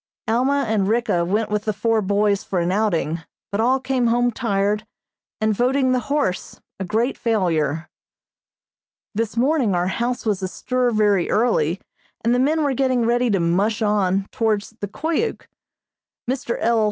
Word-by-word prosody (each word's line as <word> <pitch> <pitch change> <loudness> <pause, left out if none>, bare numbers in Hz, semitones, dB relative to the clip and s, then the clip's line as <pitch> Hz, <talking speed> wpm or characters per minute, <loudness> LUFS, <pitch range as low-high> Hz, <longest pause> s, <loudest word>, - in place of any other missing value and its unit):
Alma 260 +5 +2
and 210 -3 +1
Ricka 225 -6 +1
went 210 +5 -1
with 210 0 -1
the 215 - 0
four 220 +2 +1
boys 200 0 +1
for 190 - -3
an 170 +1 0
outing, 170 -6 0 0.3
but 200 +2 0
all 255 +3 +3
came 255 -2 0
home 245 +1 +2
tired 210 -2 0 0.6
and 215 0 +1
voting 255 +4 +2
the 255 - +2
horse 280 -11 -1 0.2
a - - -2
great 225 +8 -1
failure. 165 - 0 1.3
This 225 +1 -2
morning 255 - +2
our 175 0 +1
house 240 +5 -2
was 205 -3 0
astir 250 +6 -1
very 210 -5 +2
early, 210 -7 +1 0.5
and 235 - +3
the 245 - +2
men 305 +4 +2
were 285 -2 +1
getting 255 -2 +1
ready 240 +1 +2
to 200 -3 +2
"mush 200 +7 +1
on" 195 -2 +1
towards 215 -3 0
the 205 - -3
Koyuk. 320 - -2 0.8
Mr. 250 -2 -2
L. 230 0 +2
220 Hz, 160 wpm, -21 LUFS, 195-245 Hz, 1.3 s, all